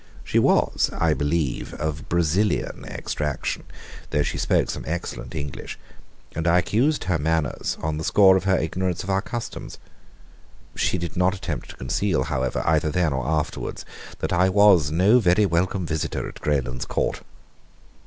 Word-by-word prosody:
She - - +1
was, - - +3
I 80 -1 +3
believe, 75 -1 -1
of 75 -1 -4
Brazilian 85 +4 0
extraction, 75 -3 -3 0.4
though 75 - +1
she - - -3
spoke - - +2 0.2
excellent 80 -7 -5
English, 70 -3 -5 0.6
and 80 +2 -1
I 85 +1 +5
excused 125 +11 +1
her 90 -3 0
manners 80 -2 -1
on 80 -1 -2
the - - -4
score 95 +2 +6
of 95 0 0
her 95 -1 +3
ignorance 90 +2 -2
of 95 - -3
our 95 0 +2
customs. 120 +2 -6 1.0
She - - +1
did 85 -1 -5
not 90 +1 +2
attempt 80 -8 -5
to - - -9
conceal, 65 +3 0
however, 65 -1 -1
either 80 0 +2
then 80 -1 +1
or 65 -1 -2
afterwards, 75 -1 -2 0.3
that - - -2
I 90 +2 +4
was 95 -6 +5
no 95 +10 +4
very 100 0 +4
welcome 90 +1 0
visitor 80 -1 -2
at - - -11
Greylands 65 -4 -1
Court. - - -1
85 Hz, 155 wpm, -24 LUFS, 75-95 Hz, 1.0 s, score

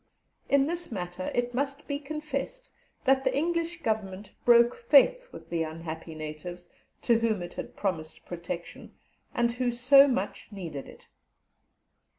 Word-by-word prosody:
In 275 -1 +5
this 345 0 -3
matter, 180 -2 -4
it 245 0 0
must 280 +3 -2
be 285 -1 -2
confessed 305 - -5 0.3
that 270 -1 +4
the 260 0 +1
English 335 +2 -1
Government 205 -2 -2
broke 235 0 +7
faith - - +4
with - - -12
the 170 -1 0
unhappy 160 0 -5
natives, 155 +3 -7 0.3
to 235 -2 +4
whom 220 -5 0
it 175 - -8
had - - -7
promised 165 -6 -3
protection, 170 0 -7 0.4
and 235 0 +1
who 245 +1 0
so 265 +4 +7
much 255 -3 -2
needed 170 -8 -6
it. - - -15
235 Hz, 145 wpm, -28 LUFS, 175-280 Hz, 0.4 s, broke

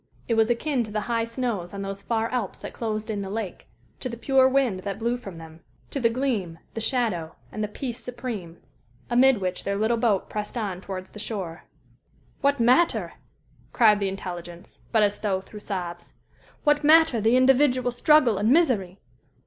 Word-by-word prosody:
It 235 - +1
was 225 0 +3
akin 250 +1 +1
to - - -10
the 210 0 -2
high 230 0 -1
snows 230 -7 -3
on 200 - -4
those 195 0 -5
far 225 +2 0
Alps 240 -7 -2
that - - -8
closed 215 -1 -3
in 205 -2 -3
the 195 - -5
lake 210 -2 -5 0.3
to 255 - -4
the 235 - -6
pure 265 +2 +4
wind 260 -8 +1
that 195 0 -4
blew 235 +2 0
from 195 -8 -9
them 160 0 -11 0.3
to 275 - -2
the 235 -3 +3
"gleam, 230 -9 -1 0.2
the 225 - -4
shadow, 215 -10 -1 0.2
and 215 - -3
the - - 0
peace 240 +3 -5
supreme," 230 -9 -6 0.5
amid 250 -1 +5
which 185 -1 -3
their 200 - -1
little 220 +3 +1
boat 220 -4 +1
pressed 210 +3 -5
on 195 -5 -3
towards 185 -1 -7
the 210 - -10
shore. 190 -6 -5 0.8
"What 280 -1 +2
matter," 250 +9 +3 0.6
cried 215 -3 +5
the 200 -1 0
intelligence, 175 -2 -8
but 220 -2 +4
as 205 0 +1
though 195 -3 0
through 210 +2 -11
sobs 175 -4 -5 0.5
"what 295 0 +3
matter 315 -5 +5
the 225 +4 +4
individual 255 -1 +4
struggle 245 -4 +4
and 210 +2 +2
misery? 240 - +2
220 Hz, 185 wpm, -25 LUFS, 195-250 Hz, 0.8 s, amid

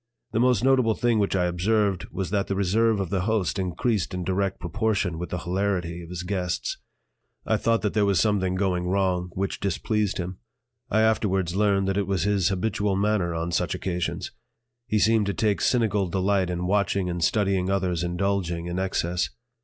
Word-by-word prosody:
The 110 - 0
most 125 -1 +3
notable 130 -4 +3
thing 120 -2 +2
which 100 -1 +1
I 90 -2 +2
observed 95 +2 +1
was 95 -3 -4
that 100 -1 0
the 100 - -1
reserve 105 +3 +2
of 95 -3 -3
the 95 -2 +1
host 100 -2 0
increased 95 +2 -1
in 90 - -3
direct 95 +2 -1
proportion 100 -2 -1
with 90 -1 -4
the 90 - -3
hilarity 90 -1 -2
of 85 - -10
his 90 -1 -5
guests. 90 -2 -2 0.7
I - - +2
thought 115 0 +1
that 105 - 0
there 105 -2 +2
was 100 -4 +3
something 95 -1 +1
going 90 -2 0
wrong 90 -1 0
which 95 +1 -2
displeased 100 +2 -1
him. 90 +1 -5 0.5
I 110 - +3
afterwards 95 -5 +1
learned 100 -1 +2
that 95 0 0
it 100 -2 0
was 95 -4 0
his 100 -3 +2
habitual 100 +1 0
manner 100 -4 +1
on 85 +1 -2
such - - 0
occasions. 90 -2 -3 0.6
He 105 - +1
seemed 110 -1 +3
to 100 - -1
take 105 -3 +1
cynical 105 -6 +2
delight 95 0 +1
in 90 0 -2
watching 100 -1 +1
and 85 -1 -2
studying 95 -1 +1
others 90 -3 0
indulging 90 -1 -1
in 85 +1 -3
excess. 90 -2 -1
95 Hz, 185 wpm, -25 LUFS, 90-105 Hz, 0.7 s, most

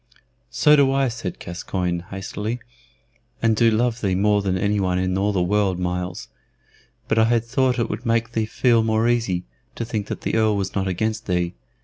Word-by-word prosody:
"So 150 - +4 0.2
I 135 0 +2
do," - - 0
said 115 -7 -5
Gascoyne, 90 0 -3
hastily, 105 +4 -4 0.8
"and 115 -1 +2
do 115 +1 +4
love 115 +2 0
thee 95 -3 +1
more 105 +1 +3
than 95 -2 0
any 105 +2 +1
one 90 -2 0
in 90 0 0
all 100 +2 +1
the 95 -3 +1
world, 100 0 +1
Myles; 90 0 -3 0.8
but - - +2
I 110 - +5
had 115 0 +1
thought 130 +1 +1
that 120 - +1
it 115 - -5
would 105 +3 -5
make 115 -1 0
thee 110 -2 -1
feel 115 0 +3
more 110 +1 +1
easy, 115 -7 0 0.3
to 115 - -3
think 110 -3 -3
that - - -5
the - - -2
Earl 110 -1 +3
was 95 -1 -2
not 95 -1 -1
against 110 +4 -2
thee. 90 -2 0
105 Hz, 205 wpm, -22 LUFS, 95-115 Hz, 0.8 s, I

